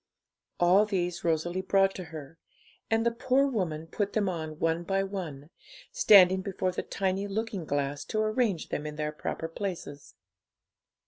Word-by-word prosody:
All 185 +4 +5
these 180 -4 -2
Rosalie 170 +2 0
brought 195 0 +3
to 185 - -7
her, 160 0 -10 0.5
and 225 +1 +2
the 235 - +3
poor 260 +3 +2
woman 180 - -2
put 200 +5 -3
them 210 -2 +1
on 160 -4 -4
one 165 +1 0
by 195 +3 0
one, 170 -7 -6 0.4
standing 190 -2 +6
before 185 -1 -2
the 180 - -3
tiny 195 +1 -2
looking 205 -3 -3
glass 145 0 -2
to 215 - -2
arrange 215 -5 0
them 150 - -3
in 150 - -6
their 150 0 -2
proper 160 +1 -4
places. 165 -5 -6
185 Hz, 155 wpm, -29 LUFS, 160-200 Hz, 0.5 s, standing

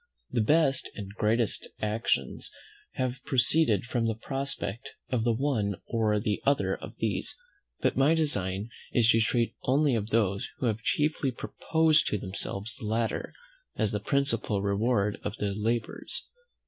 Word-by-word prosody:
The 120 - +2
best 140 +2 +3
and 100 -1 -7
greatest 110 +1 +1
actions 105 - -1 0.4
have 130 0 -2
proceeded 125 - +3
from 120 -2 0
the 110 - 0
prospect 135 -2 -3 0.2
of 120 -3 +1
the 120 - +3
one 115 -5 0
or 110 -2 +1
the 105 -1 -1
other 140 +1 +2
of - - -10
these; - - +1 0.5
but - - +2
my 145 +4 +4
design 105 - -1 0.2
is 120 -2 +4
to 115 0 +5
treat 115 +1 +1
only 140 +2 +3
of 110 -2 -1
those 100 -4 +1
who - - -2
have 110 -1 0
chiefly 150 +3 +1
proposed 160 +5 +2
to 105 - 0
themselves 100 +3 -5
the - - -7
latter 115 +1 -1 0.4
as 110 - +1
the 105 - -1
principal 115 -4 +1
reward 105 +1 +1
of 110 - -4
their 100 -1 -1
labours. 110 +2 -1
115 Hz, 150 wpm, -29 LUFS, 105-135 Hz, 0.5 s, to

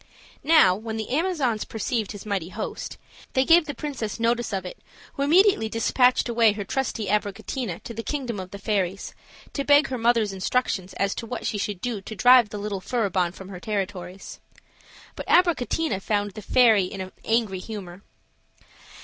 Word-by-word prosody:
Now, 300 - +6
when 220 +3 -5
the 220 +1 -5
Amazons 285 - 0
perceived 220 -1 -3
his 205 -1 -9
mighty 195 -5 -2
host, - - -6 0.4
they 260 0 +3
gave 335 +1 +6
the 290 - -4
princess 255 -8 -4
notice 235 0 0
of 190 -2 -3
its 180 - -9 0.3
who - - -5
immediately 320 - +4
dispatched 250 +3 +2
away 230 -2 +4
her 205 -1 -4
trusty 230 +1 -2
Abricotina 205 0 -2
to 235 - -7
the 230 - -4
kingdom 245 -5 -3
of 185 -1 -7
the 200 - -8
fairies, 195 -2 -2 0.4
to 280 - -2
beg 290 +1 +5
her 255 -2 -3
mother's 230 -3 +2
instructions 190 -1 -1
as 200 0 0
to 230 - -6
what 245 +1 -5
she 205 - -1
should 200 -2 -3
do 235 -5 -3
to 220 - -8
drive 245 0 +6
the 210 - -6
little 200 -2 -4
Furibon 195 -5 0
from 190 +1 -11
her 185 -2 -8
territories. 190 -2 -5 0.8
But - - -7
Abricotina 325 - +2
found 205 0 -1
the 215 - -9
fairy 220 -3 +4
in 190 +1 -7
an 185 0 -6
angry 225 -4 0
humor. 190 -3 -8
220 Hz, 175 wpm, -25 LUFS, 195-250 Hz, 0.8 s, Now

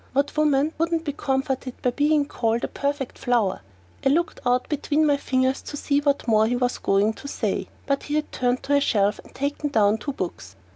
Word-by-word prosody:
What 280 +2 0
woman 300 0 +2
wouldn't 330 0 +1
be 290 - -2
comforted 265 -2 -2
by 250 - +2
being 295 +2 +2
called 230 -4 -1
a - - 0
"perfect 280 -2 -3
flower"? 230 -6 +1 0.4
I - - +4
looked 335 +5 +1
out 250 0 +2
between 300 +1 +1
my 290 -1 +4
fingers 260 -1 0
to 290 - -7
see 285 0 +1
what 285 -3 0
more 220 -1 +4
he 245 - 0
was 245 0 0
going 200 +3 +2
to 280 - -10
say, - - -2 0.2
but 275 -1 0
he 295 - -3
had 305 0 -1
turned 250 0 0
to 285 - 0
a 285 - +4
shelf 205 -5 +2
and - - -17
taken 285 +2 -2
down 215 -4 +3
two 280 - -4
books. 100 - -6
270 Hz, 210 wpm, -24 LUFS, 245-290 Hz, 0.4 s, I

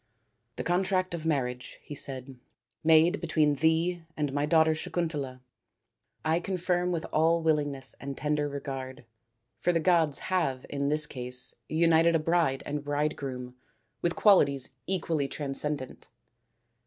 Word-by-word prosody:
" - - -48
The - - -4
contract 185 0 +1
of 165 -1 -4
marriage," 125 -5 -2
he - - -8
said, 135 -1 -4 0.3
" 120 +1 -48
made 160 +4 +5
between 150 -2 +2
thee 165 +4 +1 0.2
and 145 -3 -1
my 145 +1 0
daughter 160 0 +4
Sakuntala, 155 -6 -3 0.8
I 160 +2 +2
confirm 180 -1 -1
with 165 -2 -2
all 165 +2 +3
willingness 145 -4 +1
and 140 -1 -5
tender 150 -1 0
regard, 135 -3 -6 0.5
for 175 - +2
the 165 - +1
gods 165 -4 +3 0.2
have 135 -8 0
in 140 0 -1
this 150 +1 +3
case 125 -3 -3 0.2
united 165 +1 +4
a - - +3
bride 160 -4 +1
and 145 0 -3
bridegroom 140 -4 -3 0.5
with 170 0 0
qualities 140 - +4 0.2
equally 165 -6 0
transcendant. 140 -1 -3
150 Hz, 140 wpm, -29 LUFS, 140-170 Hz, 0.8 s, made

